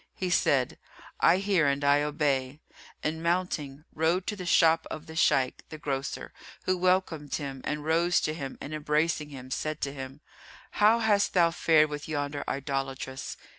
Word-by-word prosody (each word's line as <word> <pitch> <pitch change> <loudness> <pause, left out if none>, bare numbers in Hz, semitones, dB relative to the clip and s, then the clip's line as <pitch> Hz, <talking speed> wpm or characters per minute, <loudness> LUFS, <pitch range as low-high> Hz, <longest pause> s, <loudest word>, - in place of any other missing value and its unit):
He 185 -1 -2
said, 135 -6 +2 0.4
"I 170 - +5
hear 190 -6 +2
and 140 +1 0
I 145 +1 +4
obey," 145 -2 -1 0.4
and 160 +1 -2
mounting, 165 -5 -2
rode 165 +4 +1
to 210 - -2
the 180 -3 -7
shop 165 -1 +4
of 155 - -6
the 160 - -10
Shaykh, 130 -5 +2
the 155 - -7
grocer, 140 -3 -4 0.3
who 185 - +2
welcomed 180 -5 0
him 135 -3 -5
and 150 0 -3
rose 170 +2 +3
to 155 - -1
him 140 -4 -6
and 150 - -7
embracing 150 0 0
him 130 -2 -10
said 155 +3 -2
to 140 - -2
him, 135 +1 -8 0.5
"How 215 +2 +4
hast 205 -3 +2
thou 170 -2 +5
fared 155 -2 +3
with 145 0 -5
yonder 145 -1 -2
idolatress?" 135 -1 -4
150 Hz, 170 wpm, -28 LUFS, 140-170 Hz, 0.5 s, I